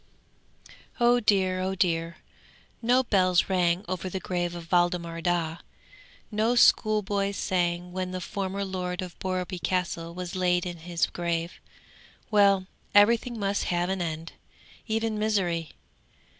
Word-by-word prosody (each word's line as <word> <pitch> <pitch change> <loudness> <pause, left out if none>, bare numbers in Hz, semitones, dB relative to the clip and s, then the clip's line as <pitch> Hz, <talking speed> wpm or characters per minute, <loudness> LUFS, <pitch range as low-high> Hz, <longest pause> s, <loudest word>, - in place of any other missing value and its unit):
'Oh 240 0 +5
dear! 190 -4 +2
oh 190 +1 -1
dear! 170 -2 0 0.6
No 250 +3 +3
bells 185 -6 +2
rang 180 0 +1
over 185 0 -3
the 190 - -3
grave 175 -2 -2
of 170 -1 -9
Waldemar 175 -1 +1
Daa. 170 -1 0 0.7
No 220 +3 +1
schoolboys 205 -4 +3
sang 175 -1 -1
when 185 0 -3
the 185 0 -4
former 195 +1 -3
lord 180 -1 -3
of 180 -2 -10
Borreby 185 -1 -3
Castle 170 -2 -2
was 180 0 -5
laid 180 -1 +1
in 175 -1 -5
his 170 +1 -1
grave. 170 0 -3 0.7
Well, 200 -2 +4 0.3
everything 230 +3 +4
must 200 0 0
have 175 0 0
an 190 -1 -1
end, 165 -1 -4 0.5
even 220 -1 -1
misery! 175 -8 0
185 Hz, 130 wpm, -27 LUFS, 175-200 Hz, 0.7 s, Oh